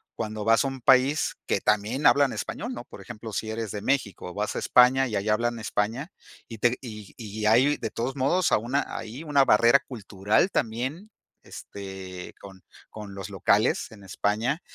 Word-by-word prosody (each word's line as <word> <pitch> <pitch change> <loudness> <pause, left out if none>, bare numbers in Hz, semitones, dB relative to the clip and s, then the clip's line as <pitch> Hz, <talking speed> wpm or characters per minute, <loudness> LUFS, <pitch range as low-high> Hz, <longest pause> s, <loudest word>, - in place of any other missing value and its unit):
cuando 110 -2 -4
vas 115 +4 +4
a - - +1
un 135 -2 -8
país 130 +4 +3
que - - 0
también 105 +7 +1
hablan 140 -2 +4
español? 240 +4 -5
¿No? - - -8
Por - - -12
ejemplo, 110 -2 -9
si 110 +1 -3
eres 110 -1 -4
de 100 +1 -6
México, 105 -9 -1
vas 105 +2 -3
a - - -1
España 130 +2 +5
y 110 - -4
ahí 100 +2 -1
hablan 115 +2 0
España, 110 - -2 0.4
y 115 - -9
te 120 +3 +2
y 105 -5 -9
y 110 -2 -6
hay 125 +7 +4
de - - -4
todos 125 +4 -3
modos 150 +7 +1
a - - +5
una 125 +6 -1
ahí 120 +8 -7
una 145 -3 +3
barrera 115 +3 +6
cultural 110 - 0
también, 135 - -3 0.3
este, 95 -2 -9
con 95 -2 -13 0.3
con 105 -2 -9
los 95 -2 -7
locales - - +1
en 105 -2 -14
España, 110 - -1
115 Hz, 185 wpm, -26 LUFS, 105-135 Hz, 0.4 s, barrera